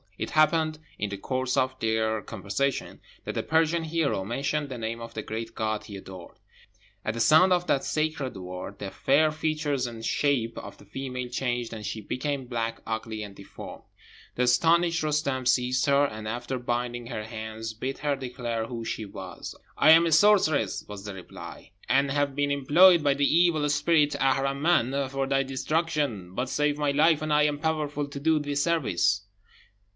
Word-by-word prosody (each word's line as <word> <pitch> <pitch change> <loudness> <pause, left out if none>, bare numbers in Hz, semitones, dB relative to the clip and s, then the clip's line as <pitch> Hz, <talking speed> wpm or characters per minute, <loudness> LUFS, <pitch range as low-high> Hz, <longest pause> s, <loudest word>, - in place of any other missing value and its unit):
It - - -4
happened, 155 0 +3 0.2
in 105 - -1
the 100 - -5
course 130 +4 -2
of 130 0 0
their 110 -1 0
conversation, 110 +7 -3 0.2
that - - -3
the - - -1
Persian 160 +1 +1
hero 155 -10 0
mentioned 140 +7 -2
the 130 - -5
name 115 0 -4
of 115 0 -9
the 110 - -4
great 115 +1 -5
God 110 -1 -2
he 100 - -9
adored. 95 -2 -10 0.7
At 110 - -2
the - - -4
sound 155 +11 +6
of 175 0 +1
that 135 -5 +1
sacred 155 -5 -2
word 90 +2 -7
the 100 -1 -6
fair 155 +3 +3
features 150 -3 -1
and 115 -1 -7
shape 130 -6 0
of - - -10
the - - -17
female 125 +3 -5
changed, 120 -1 -2
and 110 -1 -7
she 110 +1 -4
became 135 +5 -3
black, 115 -2 -3
ugly, 110 -1 -4
and 100 -1 -9
deformed. 100 - -10 0.5
The 125 - +1
astonished 170 +7 +3
Roostem 140 -4 0
seized 125 +1 +2
her, 140 0 +4
and 110 -5 -6
after 120 +3 -3
binding 120 0 -3
her 115 -3 -4
hands, 110 0 -6
bid 130 +5 -4
her 145 -1 0
declare 120 -4 -4
who 115 -2 -6
she 110 -1 -3
was. 95 -2 -8 0.2
"I 155 - +6
am 165 +1 +7
a 165 - 0
sorceress," 160 - +4
was 105 -1 -8
the 100 -2 -6
reply, 90 - -10 0.2
"and 135 +1 +3
have 145 -1 0
been 145 0 0
employed 160 +5 +6
by 140 -1 +3
the 140 0 +2
evil 165 -3 +3
spirit 150 +1 +2
Aharman 135 0 +1
for 135 0 -1
thy 135 0 +2
destruction; 135 - -1
but 125 +1 -2
save 150 +1 +1
my 150 -1 +1
life, 155 +2 +4
and 155 -1 0
I 150 0 +4
am 150 -1 +1
powerful 150 -2 -1
to 140 0 -7
do 160 +2 +3
thee 145 -1 -3
service." 100 - +1
135 Hz, 180 wpm, -27 LUFS, 115-150 Hz, 0.7 s, am